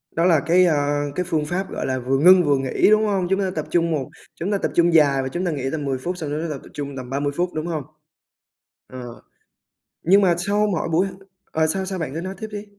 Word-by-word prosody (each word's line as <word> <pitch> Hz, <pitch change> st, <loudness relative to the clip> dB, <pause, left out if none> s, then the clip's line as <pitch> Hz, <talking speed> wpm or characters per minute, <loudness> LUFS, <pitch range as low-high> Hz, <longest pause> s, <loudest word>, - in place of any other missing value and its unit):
Đó 165 Hz, +1 st, +2 dB
là 165 Hz, -5 st, +5 dB
cái, 180 Hz, +2 st, +5 dB
à, 145 Hz, -2 st, +1 dB
cái 180 Hz, -, 0 dB
phương 155 Hz, -2 st, 0 dB
pháp, 185 Hz, +4 st, -3 dB
gọi -, -, -3 dB
là, 130 Hz, -1 st, -1 dB
vừa 130 Hz, +2 st, 0 dB
ngưng 180 Hz, +4 st, +7 dB
vừa 145 Hz, -2 st, +2 dB
nghỉ, 135 Hz, +8 st, +2 dB
đúng 215 Hz, 0 st, +4 dB
hông? 195 Hz, -4 st, 0 dB
Chúng 195 Hz, +1 st, +1 dB
ta 190 Hz, -2 st, 0 dB
tập 155 Hz, -, -2 dB
trung 170 Hz, -1 st, +1 dB
một 140 Hz, -5 st, -2 dB, 0.3 s
chúng 185 Hz, +5 st, -3 dB
ta 200 Hz, -, +2 dB
tập -, -, -2 dB
trung 170 Hz, 0 st, +4 dB
dài 140 Hz, -4 st, +4 dB
và 130 Hz, -, -3 dB
chúng 175 Hz, +7 st, -3 dB
ta 175 Hz, -, 0 dB
nghỉ 135 Hz, -3 st, -3 dB
tầm 150 Hz, -3 st, -3 dB
10 135 Hz, -1 st, -1 dB
phút 180 Hz, +7 st, -4 dB
xong 155 Hz, -4 st, -5 dB
chúng 150 Hz, +2 st, -2 dB
ta 170 Hz, -, -3 dB
tập -, -, -8 dB
tập -, -, -14 dB
trung 140 Hz, -1 st, -5 dB
tầm 125 Hz, -1 st, -7 dB
30 145 Hz, +1 st, -1 dB
phút, 180 Hz, +1 st, -1 dB
đúng 155 Hz, +2 st, -3 dB
hông? 155 Hz, -4 st, -3 dB, 1.0 s
Ờ. 125 Hz, -2 st, -10 dB, 0.8 s
Nhưng 195 Hz, +4 st, +5 dB
mà 175 Hz, -3 st, +3 dB
sau 205 Hz, +4 st, +1 dB
mỗi 180 Hz, -5 st, -1 dB
buổi 175 Hz, +4 st, +2 dB
h -, -, -6 dB, 0.4 s
ờ, 160 Hz, 0 st, +1 dB
sao 190 Hz, +4 st, -1 dB
sao? 190 Hz, -1 st, -4 dB
Bạn 145 Hz, -4 st, -4 dB
cứ 165 Hz, -, -3 dB
nói 190 Hz, +1 st, -5 dB
tiếp 220 Hz, -, -6 dB
đi! 210 Hz, 0 st, -6 dB
165 Hz, 270 wpm, -22 LUFS, 145-185 Hz, 1.0 s, ngưng